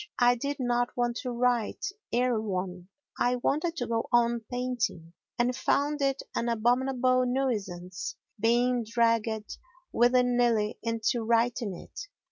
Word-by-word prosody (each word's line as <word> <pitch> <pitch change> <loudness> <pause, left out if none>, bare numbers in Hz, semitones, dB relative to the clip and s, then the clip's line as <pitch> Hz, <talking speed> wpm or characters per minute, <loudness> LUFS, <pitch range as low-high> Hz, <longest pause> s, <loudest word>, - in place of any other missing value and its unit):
I 245 0 +5
did 280 +4 -3
not 245 -1 0
want 240 -1 0
to 250 - -4
write 240 - 0 0.3
Erewhon, 195 -7 -1 0.3
I 245 +1 +2
wanted 305 +7 0
to 245 - -2
go 230 -1 -1
on 235 -1 +3
painting 245 -10 -2 0.2
and 245 +1 +1
found 290 +3 0
it 275 0 0
an 235 - -1
abominable 255 +2 +2
nuisance 195 -9 -2 0.2
being 240 +2 +2
dragged 225 -1 0 0.3
willy 245 +1 +4
nilly 240 -3 +1
into 230 +1 0
writing 230 -3 +1
it. - - -9
240 Hz, 125 wpm, -28 LUFS, 225-250 Hz, 0.3 s, I